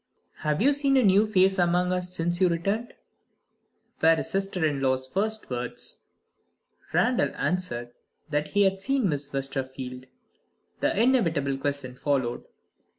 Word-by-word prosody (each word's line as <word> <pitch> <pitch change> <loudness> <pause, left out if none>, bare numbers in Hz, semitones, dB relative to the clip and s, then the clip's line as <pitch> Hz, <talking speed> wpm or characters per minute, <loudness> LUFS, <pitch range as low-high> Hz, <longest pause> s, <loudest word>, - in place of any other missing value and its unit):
"Have 150 +5 0
you 285 +3 +5
seen 275 -1 +2
a 260 - +4
new 200 +1 +5
face 190 -2 +3
among 180 +1 +2
us, 180 0 -2
since 175 +2 -1
you 185 - +5
returned?" 200 +8 -2 1.1
were 165 +1 +6
his - - -4
sister 195 -3 0
in 145 -3 0
law's 130 -1 +1
first 215 +8 -1
words. 125 0 -5 0.9
Randal - - +2
answered 120 -10 -2 0.4
that 150 -1 -1
he 205 +4 +2
had 195 0 +1
seen 265 -2 +1
Miss 145 -1 -3
Westerfield. 130 -2 -5 0.7
The - - +1
inevitable 165 - +2
question 140 -2 -3
followed. 130 -2 -1
170 Hz, 140 wpm, -26 LUFS, 140-195 Hz, 1.1 s, were